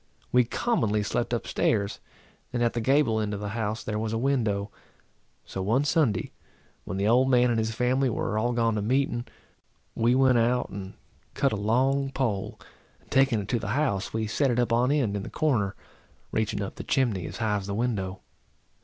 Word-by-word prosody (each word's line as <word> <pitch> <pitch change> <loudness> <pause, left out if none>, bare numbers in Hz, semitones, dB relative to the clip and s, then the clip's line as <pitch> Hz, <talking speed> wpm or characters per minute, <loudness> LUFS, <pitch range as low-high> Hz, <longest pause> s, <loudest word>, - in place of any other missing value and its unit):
We 125 -1 +4
commonly 115 - 0
slept 120 +3 -1
up 120 - -1
stairs, 100 -2 0 0.5
and 120 -2 0
at 120 - +1
the 120 - -1
gable 130 -2 +3
end 105 -1 -1
of - - -5
the 105 0 -4
house 110 0 -3
there 105 -1 -2
was 110 0 -2
a - - 0
window. 110 -6 0 0.7
So 95 - -5
one 115 +9 +2
Sunday, 145 - +1 0.5
when 95 - -4
the 100 +1 +1
old 125 +4 +4
man 125 -1 +4
and 115 - +1
his 110 0 -1
family 130 +3 +2
were 110 - -2
all 115 +3 +1
gone 115 -1 +2
to 105 - -1
meeting, 120 +1 0 0.7
we 120 +2 +2
went 130 -2 +4
out 120 +2 +1
and 95 -1 -7 0.4
cut 140 - +2
a - - 0
long 130 +7 +1
pole, 115 -8 -2 0.4
and, - - -28
taking 135 -5 +3
it 100 - -8
to 120 - +1
the 105 - -5
house, 110 -9 0
we 110 0 -1
set 135 +6 +1
it 120 - 0
up 120 -1 +1
on 125 +3 +3
end 130 -9 +1
in 100 - -2
the - - -7
corner, 115 -11 0 0.6
reaching 105 -2 -1
up 95 - -7
the - - -5
chimney 110 -10 0
as - - -7
high 110 -2 0
as 100 -1 -6
the 100 - -3
window. 100 -5 -2
115 Hz, 205 wpm, -27 LUFS, 105-125 Hz, 0.7 s, We